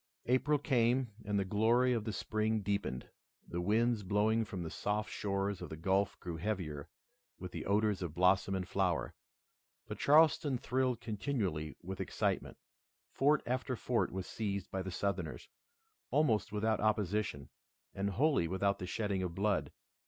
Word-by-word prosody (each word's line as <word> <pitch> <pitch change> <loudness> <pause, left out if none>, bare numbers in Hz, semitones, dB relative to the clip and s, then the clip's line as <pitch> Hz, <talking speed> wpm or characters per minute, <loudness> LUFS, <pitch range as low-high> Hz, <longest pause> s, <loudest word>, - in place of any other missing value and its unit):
April 130 +4 +3
came, 125 -4 +1
and 105 0 0
the 100 - +1
glory 115 +6 +3
of 115 -3 -1
the 110 - -1
spring 110 +1 -1
deepened. 100 -11 -2 0.4
The 85 - -3
winds 110 +4 +2
blowing 105 +3 +2
from 95 -4 -5
the 80 - -5
soft 105 +1 -2
shores 100 -1 -2
of - - -6
the 80 - -7
Gulf 95 +4 +1
grew 85 -2 -5
heavier 80 -6 -3 0.5
with 90 -1 -7
the - - -5
odors 105 0 +2
of 85 -3 -4
blossom 95 +2 +3
and 90 -1 -3
flower. 90 -12 0 0.7
But - - -7
Charleston 150 -2 +5
thrilled 125 0 0
continually 100 - -2
with 95 +2 -5
excitement. - - -1 0.5
Fort 145 +2 +3
after 130 +1 -1
fort 120 +1 0
was 95 0 -4
seized 100 -3 -3
by 95 - -2
the 95 - -4
Southerners, 100 +2 -3 0.6
almost 125 -8 +2
without 110 +1 +1
opposition 105 -7 0 0.4
and 100 +1 -1
wholly 135 - +2
without 100 +3 0
the 90 - -4
shedding 100 +1 -1
of 90 -2 -3
blood. 100 +1 0
105 Hz, 155 wpm, -34 LUFS, 95-115 Hz, 0.7 s, Charleston